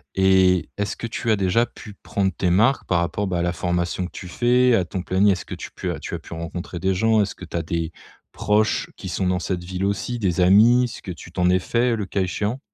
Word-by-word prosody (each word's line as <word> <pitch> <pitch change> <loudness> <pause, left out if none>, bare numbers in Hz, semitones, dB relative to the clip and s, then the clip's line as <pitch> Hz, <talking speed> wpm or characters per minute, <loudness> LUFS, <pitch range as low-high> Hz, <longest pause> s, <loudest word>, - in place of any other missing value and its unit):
Et, 95 -1 +4
est-ce 105 0 -2
que - - -5
tu 115 0 -4
as 110 - +5
déjà 100 +5 +2
pu 105 -3 -12
prendre 95 -1 -2
tes 90 - 0
marques 110 +9 +3
par 85 -2 +2
rapport 85 +4 -1
bah, 90 -2 -1
à - - +1
la 85 0 0
formation 90 +1 -1
que - - -16
tu 90 - -8
fais, 125 +6 +3
à 95 - +2
ton 90 +1 -5
planning? 100 +2 +3
Est-ce 95 - -2
que - - -7
tu - - -8
pu - - -5
tu - - -5
as - - -5
pu - - -11
rencontrer 85 +1 -6
des 95 +2 +1
gens? 110 +2 +3
Est-ce 100 - -2
que 90 - -10
tu 85 - -9
as - - 0
des 85 +1 -3 0.4
proches 105 +1 +1
qui - - -7
sont 95 - -1
dans 90 0 +1
cette 90 0 -3
ville 95 +2 -3
aussi? 100 +5 -2
Des 95 -4 0
amis? 115 +7 +6
Est-ce 120 - -7
que 95 - -5
tu 85 0 -10
t'en 90 0 +1
es 90 0 +3
faits, 120 +5 +1
heu, - - +1
le 105 -3 -3
cas 95 +1 -2
échéant? 105 +7 -2
95 Hz, 265 wpm, -22 LUFS, 90-105 Hz, 0.4 s, amis